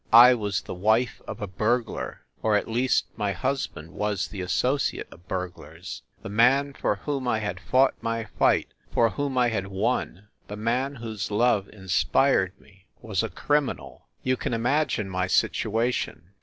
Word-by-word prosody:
I 120 +2 +10
was 105 -5 -1
the - - -7
wife 110 +6 +1
of 110 - -5
a - - -2
burglar, 110 +5 -1 0.2
or 110 -1 +2
at 105 - +1
least 125 +3 +2
my 105 -2 0
husband 130 - -3
was 105 -2 -2
the 100 - -6
associate 130 +9 0
of 85 +2 -16
bur 90 -1 -1
glars. 65 -7 -10 0.2
The - - -5
man 130 +6 +4
for 105 - 0
whom 135 +4 -3
I 120 - +2
had 105 -1 -3
fought 130 +1 +3
my 115 0 -1
fight, - - +2 0.2
for 115 -2 +3
whom 140 +4 -2
I 125 -1 +4
had 100 -4 -2
won, 100 -1 -2 0.2
the 105 - -6
man 125 +6 0
whose 110 -5 -5
love 105 -2 +2
inspired 95 +1 +1
me, 95 +1 -23 0.2
was 105 -5 0
a - - -2
criminal! 130 - -1 0.2
You 130 0 +1
can 115 - -2
imagine 125 -2 +1
my 90 -1 -1
situation. 110 - 0
110 Hz, 170 wpm, -26 LUFS, 100-125 Hz, 0.2 s, I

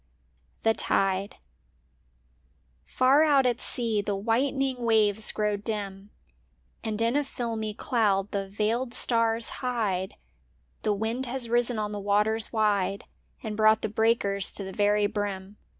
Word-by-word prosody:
XTbe 195 -3 +1
Zibc - - -29
AR 270 +4 +6
out 285 -4 +4
at 245 -1 0
sea 230 -4 0
the 200 0 -2
whitening 255 +5 0
waves 220 -2 +3
grow 210 -1 -1
dim 200 -2 -5 0.7
And 220 -1 -3
in 230 +3 +1
a 290 - +2
filmy 225 -5 -4
cloud 205 -6 0
the 195 -1 -2
veiled 230 +5 -1
stars 230 -1 +1
hide; 210 -7 -2 0.7
The 210 - +1
wind 225 +5 -2
has 245 -1 -2
risen 240 0 +1
on 210 -1 -2
the 205 - -4
waters 210 +2 +1
wide 205 -3 0 0.4
And 215 -1 -4
brought 215 0 +4
the - - -1
breakers 210 -3 +2
to 200 - -6
the 190 0 -7
very 205 +1 +2
brim. 205 -1 -4
215 Hz, 135 wpm, -27 LUFS, 200-230 Hz, 0.7 s, AR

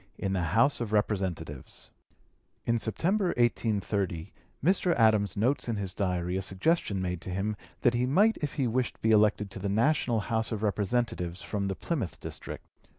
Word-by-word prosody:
225) - - -5
IN 95 - 0
THE 85 -5 -1
HOUSE 125 +4 +4
OF 110 -3 -3
REPRESENTATIVES 95 - -2 0.7
In 115 0 +2
September, 185 - 0
1830, 100 -7 0 0.3
Mr. 180 -1 +3
Adams 110 -5 +3
notes 125 +4 +1
in 115 - 0
his 95 -3 -3
Diary 90 -3 -1
a - - -1
suggestion 100 - 0
made 90 -2 -3
to - - -6
him 100 +4 -1 0.3
that 120 - +4
he 120 +1 +1
might 205 +11 +4
if 150 -2 -4
he 135 - +1
wished 125 +1 -1
be 110 - +4
elected 105 -2 +3
to 100 - -6
the 100 +1 -2
national 115 +1 +2
House 110 +2 -1
of 110 -1 -3
Representatives 100 -4 -1
from 100 -2 -2
the 95 - -2
Plymouth 125 - -3
district. - - -8
105 Hz, 175 wpm, -29 LUFS, 95-120 Hz, 0.7 s, HOUSE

